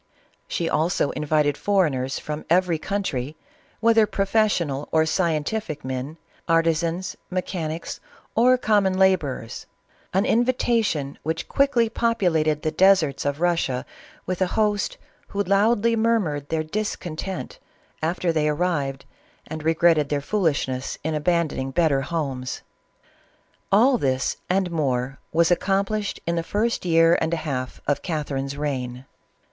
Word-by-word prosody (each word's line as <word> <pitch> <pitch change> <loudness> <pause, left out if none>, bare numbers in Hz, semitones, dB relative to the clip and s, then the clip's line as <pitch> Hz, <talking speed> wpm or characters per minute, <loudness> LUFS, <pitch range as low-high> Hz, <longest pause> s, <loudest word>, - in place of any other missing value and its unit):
She 170 - -2
also 160 -2 +1
invited 150 -1 0
foreigners 150 -10 +1
from 150 0 -5
every 175 -1 +3
country, 155 -8 -3 0.4
whether 225 -1 +5
professional 195 -8 0
or 160 0 +3
scientific 160 0 -1
men, 130 +4 -4 0.3
arti 165 0 +4
sans, 170 +3 -3
mechanics, 170 -3 -4 0.3
or 250 +3 +5
common 205 -5 +2
laborers 160 -12 +1 0.2
— - - -35
an 195 +3 +3
invitation 230 - +1
which 160 +2 -3
quickly 275 -4 +2
populated 175 -10 +1
the 155 - 0
deserts 165 -6 +3
of 145 +2 -1
Russia 165 -8 0 0.4
with 185 0 -3
a 185 - +3
host 210 -2 +1 0.3
who 200 0 -1
loudly 210 +4 +3
murmured 205 -11 0
their 160 -1 0
discontent 185 -1 -4 0.4
after 170 +2 0
they 150 -1 +1
arrived, 145 -4 -1 0.4
and 155 0 -6
regretted 160 -2 +3
their 145 - 0
foolishness 140 -7 -1
in 160 +1 -1
abandoning 155 -4 0
better 140 -1 +2
homes. 135 -5 -3 1.1
All 240 +5 +5
this, 130 -1 0
and 185 -1 +1
more, 135 -4 -1
was 165 +1 +3
accomplished 195 +3 0
in 170 0 -1
the - - +1
first 210 +5 -1
year 165 0 +4
and 160 +1 +1
a 160 -1 -6
half 130 -4 -3
of 145 - 0
Catherine's 140 -4 -3
reign. 130 -3 -3
165 Hz, 130 wpm, -24 LUFS, 145-195 Hz, 1.1 s, whether